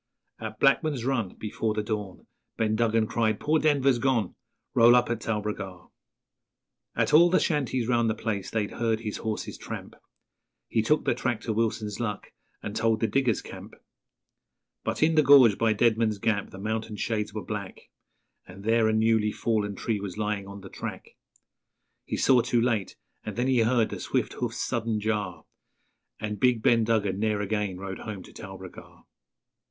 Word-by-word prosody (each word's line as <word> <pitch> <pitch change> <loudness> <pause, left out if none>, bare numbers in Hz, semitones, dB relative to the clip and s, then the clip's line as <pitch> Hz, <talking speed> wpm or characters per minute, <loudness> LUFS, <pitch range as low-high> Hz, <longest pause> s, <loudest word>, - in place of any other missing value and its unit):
At 110 -1 -7
Blackman's 135 -2 +2
Run 120 -8 -1
Before 110 0 -3
the 105 - -1
dawn, 105 -3 -5 0.3
Ben 110 -1 +1
Duggan 115 -1 +2
cried, 110 -1 0
'Poor 155 +1 +2
Denver's 140 -5 +3
gone! 120 -7 +1 0.4
Roll 120 +1 +7
up 125 -1 +3
at 115 -1 -2
Talbragar!' 105 -4 -4 1.0
At - - +1
all 170 +3 +7
the 185 - +4
shanties 130 -7 0
round 120 -2 +2
the 110 - 0
place 100 -4 -3
they'd 110 -2 -2
heard 115 -1 -1
his 105 -2 -4
horse's 110 -1 -4
tramp, - - -7 0.7
He 115 - +1
took 150 +8 +1
the - - +3
track 120 -2 -2
to 115 - -2
Wilson's 110 -1 -1
Luck, 105 -4 -4 0.3
and 105 - -5
told 115 -1 +1
the 115 - +1
diggers' 125 -2 +1
camp; - - -10 1.1
But - - -1
in 160 +1 +4
the 155 - +5
gorge 130 -7 +7
by 115 -1 +3
Deadman's 110 -1 +2
Gap 100 0 -1
the - - -11
mountain 110 +2 -3
shades 105 0 -2
were 105 0 -6
black, 100 -3 -6 0.7
And 95 +2 -12
there 115 +1 +3
a 110 - +2
newly 110 -1 +2
fallen 105 -3 -1
tree 110 +2 -2
was 100 -1 -6
lying 105 -2 -2
on 100 0 -9
the 95 - -10
track - - -7 1.0
He - - -3
saw 130 -2 +5
too 120 - +1
late, 115 -5 0 0.3
and 105 - -6
then 120 - 0
he 130 -2 +3
heard 115 0 +3
the - - -6
swift - - -1
hoof's - - -3
sudden 115 -2 -1
jar, 105 -5 -2 0.7
And 105 -2 -4
big 120 -2 +2
Ben 115 -1 +4
Duggan 105 -4 0
ne'er 105 -1 0
again 105 -2 -2
rode 95 0 -6
home 105 -4 -7
to - - -15
Talbragar. - - -11
110 Hz, 175 wpm, -27 LUFS, 105-120 Hz, 1.1 s, Roll